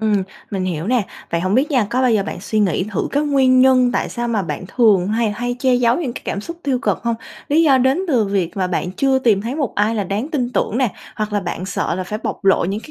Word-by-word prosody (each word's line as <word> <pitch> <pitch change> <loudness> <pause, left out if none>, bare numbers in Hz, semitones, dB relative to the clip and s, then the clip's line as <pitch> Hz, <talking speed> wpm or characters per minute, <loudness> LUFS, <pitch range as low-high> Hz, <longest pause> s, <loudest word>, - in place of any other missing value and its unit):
ừm. 210 -3 +1 0.3
Mình 190 -2 -2
hiểu 170 -2 -3
nè. 245 0 +2 0.3
Vậy 170 - 0
hổng 185 +2 0
biết 270 +6 +2
nha, 250 -7 +2
có 255 +2 +1
bao 255 - +3
giờ 210 - +2
bạn 185 - -6
suy 215 +2 -2
nghĩ 185 -3 +1
thử - - -1
cái 285 - +2
nguyên 265 -3 +3
nhân 255 -1 +4
tại - - -1
sao 240 0 -3
mà 220 -4 0
bạn 185 - -5
thường 205 -7 +3
hay 220 +1 +1
hay 245 +3 -3
che 255 0 +2
giấu 245 0 +3
những 260 -8 -3
cái - - -8
cảm 200 - -3
xúc 335 +10 -7
tiêu 265 -3 0
cực - - -1
hông? 235 -1 0 0.3
Lý 315 +3 +4
do 275 -4 +5
đến 260 +4 +2
từ 245 -8 +3
việc 195 -3 -2
mà 185 - 0
bạn 180 0 -2
chưa 265 +5 +2
tìm 220 -6 +2
thấy 235 +4 -3
một 285 -6 -2
ai 210 +2 +1
là 210 -3 -1
đáng 205 - -3
tin 250 -6 -1
tưởng 235 -1 0
nè, 250 -7 +1 0.2
hoặc 215 -1 -3
là 205 - +1
bạn 175 0 -4
sợ 190 - -2
là 185 +1 -3
phải 210 +4 -4
bộc - - -4
lộ 195 -3 +4
những 200 +4 -2
cái 305 - -13
230 Hz, 285 wpm, -19 LUFS, 195-255 Hz, 0.3 s, do